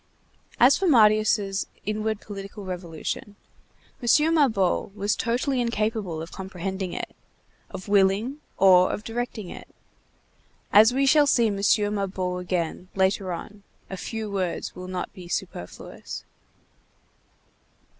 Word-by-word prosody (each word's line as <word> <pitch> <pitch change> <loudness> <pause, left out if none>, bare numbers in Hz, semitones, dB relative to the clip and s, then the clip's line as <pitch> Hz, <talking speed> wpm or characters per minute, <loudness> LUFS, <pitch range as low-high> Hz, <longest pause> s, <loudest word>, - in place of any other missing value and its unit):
As 255 +4 +6
for 385 - +1
Marius' 215 - +3 0.2
inward 215 0 -2
political 200 0 -8
revolution, 180 +2 -5 0.7
M. 300 +7 +4
Mabeuf 220 - +2
was 205 0 0
totally 250 +2 0
incapable 215 -7 -1
of 165 - -10
comprehending 190 0 -5
it, - - -5 0.5
of 190 0 -8
willing 205 +7 +2 0.2
or 185 -1 +6
of 210 - -4
directing 225 -4 -4
it. - - -10 1.1
As 215 +3 +8
we 270 +2 +2
shall 290 +2 +5
see 240 -4 +4
M. 205 -2 0 0.4
Mabeuf 185 -3 -2
again, 180 0 -2
later 190 0 +1
on, 205 +4 -7 0.3
a - - -3
few 220 +3 -5
words 185 -3 -2
will 180 0 -8
not 185 -1 -4
be 185 -3 -11
superfluous. 175 - -6
200 Hz, 120 wpm, -25 LUFS, 185-225 Hz, 1.1 s, As